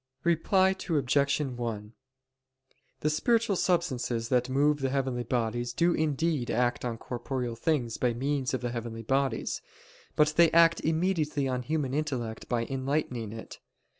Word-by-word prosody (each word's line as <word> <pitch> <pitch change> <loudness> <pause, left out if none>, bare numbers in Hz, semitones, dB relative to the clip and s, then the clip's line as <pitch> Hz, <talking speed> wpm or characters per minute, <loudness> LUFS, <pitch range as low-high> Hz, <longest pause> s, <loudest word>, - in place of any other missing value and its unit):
Reply 185 +3 +3 0.2
Obj. 140 -2 +2
1: 120 -6 -4 1.1
The 150 - +2
spiritual 225 +6 +2
substances, 130 -11 0
that 125 0 +2
move 145 +3 +2
the 135 -1 0
heavenly 130 -2 -1
bodies, 120 0 -1
do 170 +6 +2
indeed 155 -3 0
act 120 +1 0
on 120 -2 -3
corporeal 125 0 -4
things 120 -2 -1
by 120 -2 0
means 135 +1 -1
of 125 - -4
the 120 -1 -2
heavenly 115 -1 -5
bodies; 135 0 0 0.5
but 150 0 +3
they 170 -1 +7
act 165 0 +6
immediately 160 -4 0
on 130 -1 -1
the 125 - -14
human 150 -4 -1
intellect 130 -7 -3
by 115 -2 0
enlightening 130 -4 -2
it. 110 0 -9
135 Hz, 145 wpm, -29 LUFS, 120-155 Hz, 1.1 s, they